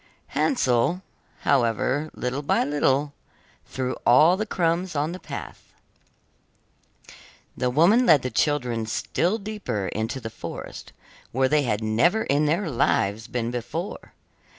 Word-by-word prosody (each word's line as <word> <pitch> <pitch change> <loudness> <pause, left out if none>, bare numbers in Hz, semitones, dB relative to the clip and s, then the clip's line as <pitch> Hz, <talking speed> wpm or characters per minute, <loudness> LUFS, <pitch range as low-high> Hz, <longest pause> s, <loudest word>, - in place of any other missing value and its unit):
Hansel, 155 - +1 0.4
however 130 +4 +1
little 125 +3 -3
by 145 - +1
little, 145 0 +1 0.5
threw 130 -1 -3
all 155 +9 +6
the 215 +3 -3
crumbs 175 -1 0
on 150 +3 0
the 180 - -7
path. - - -9 1.8
The 125 - 0
woman 180 - +4
led 150 -5 +6
the 130 - -3
children 125 -7 0
still 175 - 0
deeper 200 - -4
into 115 +5 -3
the 115 -2 -7
forest, - - -8 0.4
where 130 +2 +2
they 150 +2 +3
had 110 -5 -1
never 145 - +2
in 145 +2 +1
their 170 +5 0
lives 110 -2 +1
been 120 -1 -2
before. 160 - -5
140 Hz, 130 wpm, -24 LUFS, 120-170 Hz, 1.8 s, all